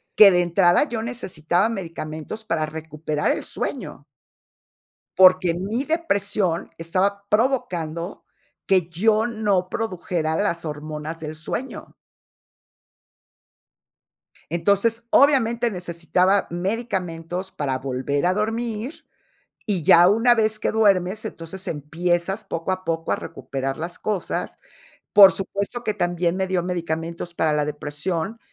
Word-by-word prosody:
que 210 -2 +10
de 180 -2 +3
entrada 175 +2 +4
yo 230 -2 -3
necesitaba 190 -5 -1
medicamentos 165 0 -6
para 165 -5 -1
recuperar 155 -1 -2
el - - -3
sueño. - - -4 1.1
Porque 185 -2 +6
mi 205 +9 -2
depresión 200 - 0
estaba 195 +4 -1
provocando 180 - -1 0.4
que 185 -4 +2
yo 215 +6 +2
no 210 -6 0
produjera 175 -6 -2
las 170 -5 -1
hormonas 155 +1 -6
del 155 0 -6
sueño. 190 +12 -6 2.6
Entonces, 200 +7 +1
obviamente, 240 -4 +4
necesitaba 180 +1 +1
medicamentos 185 -2 -3
para 135 -3 -2
volver 135 +3 -1
a 180 - +2
dormir, 225 - -3 0.6
y 195 -7 -1
ya 175 +4 +7
una 230 +4 +4
vez 215 -1 +1
que - - 0
duermes, 200 -1 +2
entonces 190 0 -7
empiezas 175 +6 -1
poco 165 +3 -3
a 185 - -6
poco 165 0 -2
a - - +2
recuperar 135 0 -5
las 170 +2 -5
cosas. 210 -4 -3 0.6
Por 200 -2 +10
supuesto 200 +5 -3
que 215 - 0
también 175 -2 0
me 190 - 0
dio 185 -2 0
medicamentos 170 -1 -4
para 160 -2 +1
la 150 -1 +1
depresión, 155 +8 -3
180 Hz, 120 wpm, -23 LUFS, 165-210 Hz, 2.6 s, que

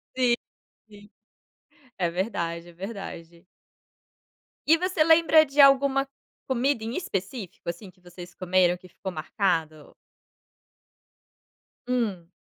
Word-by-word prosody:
Sim, 250 -2 +3 0.5
sim. 205 0 -16 0.9
É 175 -3 0
verdade, 170 -2 -3
é - - -13
verdade. 175 -3 -9 1.2
E 320 +3 +6
você 365 -2 +1
lembra 320 -1 +6
de 280 0 -6
alguma 275 0 +5 0.4
comida 260 -1 0
em 230 +3 -4
específico, 195 - -5
assim, 180 +3 -7
que 185 - -31
vocês 175 0 -12
comeram 180 -1 +2
que 185 - -16
ficou 190 +2 -7
marcado? 160 -3 -2 1.9
Hum. 220 -9 -1
195 Hz, 105 wpm, -26 LUFS, 175-265 Hz, 1.9 s, E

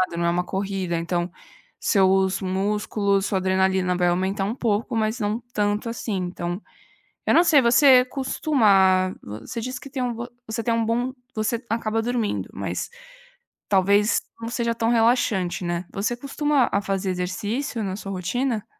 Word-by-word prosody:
caminhada, 170 - -7
não 170 - +1
é 170 - +3
uma 180 +1 0
corrida, 190 -2 -2
então, 175 +1 -2 0.5
seus 190 -1 +3
músculos, 200 +1 0
sua 195 - 0
adrenalina 190 -1 +1
vai 180 -1 +2
aumentar 190 +3 0
um 215 +4 -2
pouco, 230 0 -1
mas 220 +2 0
não 210 +3 -1
tanto, 210 +1 0
assim. 230 -3 -3
Então, 175 0 -3 0.7
eu - - +3
não 340 - +6
sei, 295 -5 +5
você 250 +2 +6
costuma 200 -9 +2
você 110 - -6
disse 250 +1 -4
que 275 - -11
tem 265 -1 -4
um 245 - -1
bom 235 +1 -5 0.2
você 220 +1 -3
tem 230 +1 +1
um 230 -1 +1
bom 245 +3 0 0.2
você 220 +3 -1
acaba 225 0 0
dormindo, 235 -2 -2
mas - - -4 0.8
talvez 200 +2 +3 0.2
não 230 - -4
seja 235 -1 -1
tão 225 0 0
relaxante, 225 -6 +2
né, 175 +1 -2
você 215 +5 -1
costuma 280 0 +1
a 200 - +1
fazer 195 -1 -1
exercício 205 +7 -3
na 190 -2 -3
sua 195 -2 -6
rotina? 220 +5 -2
210 Hz, 165 wpm, -24 LUFS, 190-235 Hz, 0.8 s, não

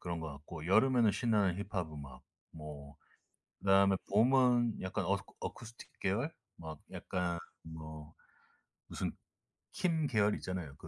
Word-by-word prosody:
그런 85 -1 -3
것 80 -2 -4
같고 75 +3 -8
여름에는 120 +3 +5
신나는 100 -4 +2
힙합 90 -6 -3
음악 70 -3 -9 0.3
뭐 75 -2 -9 0.6
그다음에 95 0 +5
봄은 120 +1 +4
약간 95 0 -2
어스쿠 100 +2 -1
어쿠스틱 115 0 -7
계열 115 +12 0 0.2
뭐 80 -2 -7
약간 90 -2 -2 0.2
뭐 80 -1 -9 0.7
무슨 - - -3 0.6
퀸 160 -4 +1
계열이 105 -5 +3
있잖아요. 90 -7 -5
그 - - -11
95 Hz, 270 characters per minute, -34 LUFS, 80-115 Hz, 0.7 s, 여름에는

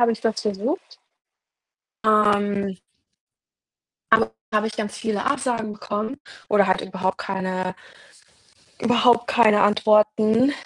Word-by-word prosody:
habe 235 -1 +4
ich 225 - -7
das 225 -1 -1
versucht. 220 - -4 1.1
Ähm 205 -2 +2 1.3
aber 110 0 +4 0.2
da - - 0
habe 215 - -1
ich 215 - -10
ganz 210 -2 -4
viele 215 -3 -3
Absagen 250 -6 -1
bekommen 215 +5 -5 0.3
oder 205 -2 +3
halt 185 0 +1
überhaupt 190 0 -3
keine 185 -1 -3 1.1
überhaupt 240 0 +3
keine 215 -3 +4
Antworten. 215 +4 +3
215 Hz, 115 wpm, -22 LUFS, 200-230 Hz, 1.3 s, habe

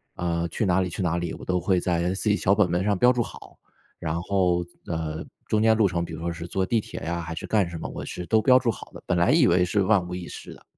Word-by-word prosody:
呃， 85 -1 -1
去 85 +6 -2
哪 95 0 +3
里 90 - -1
去 95 - -4
哪 85 -1 0
里， 85 -1 -3
我 - - -10
都 90 0 0
会 90 +1 +1
在 85 0 0
自 100 - -3
己 105 - +4
小 100 -1 +2
本 100 -4 +2
本 90 +2 +1
上 100 -1 +1
标 125 +5 +5
注 120 - 0
好， - - -9 0.4
然 80 +1 -2
后， 90 -3 +1 0.2
呃， 80 -2 -3 0.2
中 105 - +1
间 110 0 +4
路 110 -3 +4
程 85 -2 -1
比 85 - -7
如 80 - -6
说 85 0 -2
是 85 0 -7
坐 95 +1 -1
地 115 +1 +1
铁 - - -8
呀 85 +3 -3
还 80 0 -6
是 - - -5
干 100 -5 +1
什 85 -1 -7
么， - - -5
我 - - -6
是 90 - -6
都 110 +4 +3
标 125 +2 +6
注 125 -2 +1
好 - - -10
的， - - -11
本 90 - 0
来 85 +6 +3
以 155 -2 +5
为 90 -4 +4
是 100 +3 +1
万 95 -3 +2
无 90 - -5
一 90 -2 -6
失 - - -9
的。 - - -19
90 Hz, 315 characters per minute, -25 LUFS, 85-105 Hz, 0.4 s, 标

